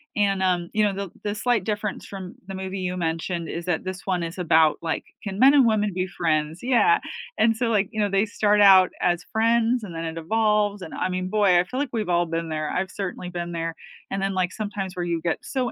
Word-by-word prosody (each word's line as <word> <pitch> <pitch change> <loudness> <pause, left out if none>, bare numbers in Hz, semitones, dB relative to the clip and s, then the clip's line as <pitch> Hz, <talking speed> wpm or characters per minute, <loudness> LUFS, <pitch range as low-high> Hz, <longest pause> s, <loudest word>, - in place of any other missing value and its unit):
and, 195 -2 +1
um, 175 -2 +1
you 215 - +2
know, 205 -1 +2
the 195 0 -4
the 205 - -1
slight 225 0 0
difference 210 -1 -3
from 190 -2 -8
the 195 - -6
movie 190 0 -5
you 180 -1 -2
mentioned 165 0 -2
is 170 0 -5
that 175 -3 -1
this 185 0 -6
one 180 -3 0
is 165 +2 -5
about, 160 -3 +4
like, 160 -1 -2 0.2
can 200 0 -5
men 275 +3 +7
and 270 - +6
women 210 -2 +2
be 185 0 -1
friends? 160 -2 -1
Yeah, 345 - +4 0.4
and 225 0 +3
so, 235 0 0
like, 210 -2 +1
you 220 - -5
know, 205 -1 +2
they 195 +2 +2
start 210 0 +2
out 190 -2 +7
as 175 0 +1
friends 230 +2 +2
and 180 -5 -7
then 165 0 -4
it 165 0 -5
evolves, 210 +1 +1
and 160 - -8
I 185 - -1
mean, 185 0 -2
boy, 200 -3 +4
I - - +3
feel 255 +8 -5
like 285 -1 -1
we've 215 -5 -2
all 175 0 +2
been 165 0 -3
there, 155 -1 -2
I've 190 +1 -2
certainly 185 -3 -5
been 175 -1 -5
there, 165 0 -3 0.4
and 195 - -2
then, 195 0 -1
like, 185 -1 0
sometimes 205 -3 -4
where 175 -1 -2
you 170 -1 -1
get 165 -1 -1
so 255 -3 -2
190 Hz, 245 wpm, -24 LUFS, 175-210 Hz, 0.4 s, men